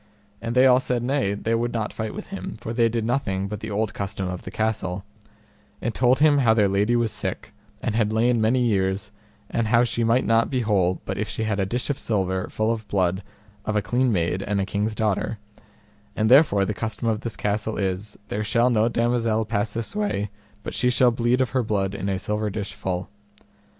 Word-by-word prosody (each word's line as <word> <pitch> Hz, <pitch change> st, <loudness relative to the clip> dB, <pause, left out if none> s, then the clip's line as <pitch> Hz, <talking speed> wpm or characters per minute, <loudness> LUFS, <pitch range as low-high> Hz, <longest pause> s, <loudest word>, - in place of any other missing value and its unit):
And 115 Hz, +1 st, -3 dB
they 130 Hz, +1 st, +6 dB
all 125 Hz, -1 st, +6 dB
said 125 Hz, -2 st, -1 dB
nay, 125 Hz, -6 st, 0 dB
they 115 Hz, +2 st, -2 dB
would 120 Hz, +1 st, 0 dB
not 110 Hz, -2 st, -2 dB
fight 110 Hz, +6 st, -4 dB
with 210 Hz, -, -7 dB
him, 195 Hz, -, -6 dB
for 115 Hz, -1 st, -5 dB
they 115 Hz, -1 st, +3 dB
did 115 Hz, -1 st, -1 dB
nothing 100 Hz, -6 st, -1 dB
but 105 Hz, 0 st, -5 dB
the 110 Hz, -, -6 dB
old 105 Hz, +1 st, -1 dB
custom 95 Hz, -2 st, -3 dB
of 90 Hz, 0 st, -4 dB
the -, -, -7 dB
castle; 100 Hz, -4 st, -2 dB, 0.7 s
and 115 Hz, -, -2 dB
told 125 Hz, +4 st, +3 dB
him 150 Hz, -1 st, +5 dB
how 115 Hz, -4 st, +4 dB
their 105 Hz, -3 st, +4 dB
lady 100 Hz, +4 st, +2 dB
was 120 Hz, -2 st, +1 dB
sick, 105 Hz, -, -4 dB, 0.3 s
and 115 Hz, -, 0 dB
had 110 Hz, -1 st, +1 dB
lain 115 Hz, +1 st, +2 dB
many 120 Hz, +4 st, +3 dB
years, 95 Hz, -3 st, 0 dB, 0.4 s
and 115 Hz, -2 st, 0 dB, 0.2 s
she 120 Hz, -, -1 dB
might 115 Hz, +3 st, +3 dB
not 115 Hz, 0 st, +3 dB
be 130 Hz, -2 st, 0 dB
whole 95 Hz, -5 st, +1 dB
but 95 Hz, -, -3 dB
if 105 Hz, 0 st, -2 dB
she 110 Hz, -, -3 dB
had 110 Hz, -2 st, -1 dB
a 95 Hz, -, +1 dB
dish 125 Hz, +7 st, -1 dB
of 140 Hz, -, -4 dB
silver 95 Hz, -4 st, -1 dB
full 110 Hz, +1 st, 0 dB
of 110 Hz, -2 st, -4 dB
blood 95 Hz, -1 st, +1 dB, 0.4 s
of 110 Hz, -, -2 dB
a 105 Hz, -, +3 dB
clean 125 Hz, +3 st, +1 dB
maid 90 Hz, -1 st, 0 dB
and 100 Hz, 0 st, -1 dB
a 95 Hz, -, 0 dB
king's 105 Hz, +2 st, -1 dB
daughter; 105 Hz, +1 st, 0 dB, 0.8 s
and 110 Hz, +2 st, +1 dB
therefore 125 Hz, -8 st, +6 dB
the 105 Hz, -, -2 dB
custom 110 Hz, +3 st, -3 dB
of 110 Hz, -1 st, 0 dB
this 115 Hz, -, -3 dB
castle 105 Hz, +1 st, -2 dB
is, 100 Hz, +1 st, -2 dB
there 105 Hz, -, -2 dB
shall 120 Hz, +3 st, +2 dB
no 115 Hz, 0 st, +3 dB
damosel 115 Hz, -2 st, +1 dB
pass 105 Hz, -1 st, -1 dB
this 115 Hz, -, -4 dB
way 155 Hz, -, -1 dB, 0.3 s
but -, -, -5 dB
she 125 Hz, -, +2 dB
shall 125 Hz, 0 st, +4 dB
bleed 120 Hz, +2 st, +1 dB
of 130 Hz, -, 0 dB
her 130 Hz, -, +2 dB
blood 100 Hz, -4 st, -1 dB
in 100 Hz, 0 st, -3 dB
a 95 Hz, -, 0 dB
silver 105 Hz, +2 st, -2 dB
dish 100 Hz, 0 st, -4 dB
full. 90 Hz, -1 st, -3 dB
110 Hz, 220 wpm, -24 LUFS, 100-120 Hz, 0.8 s, they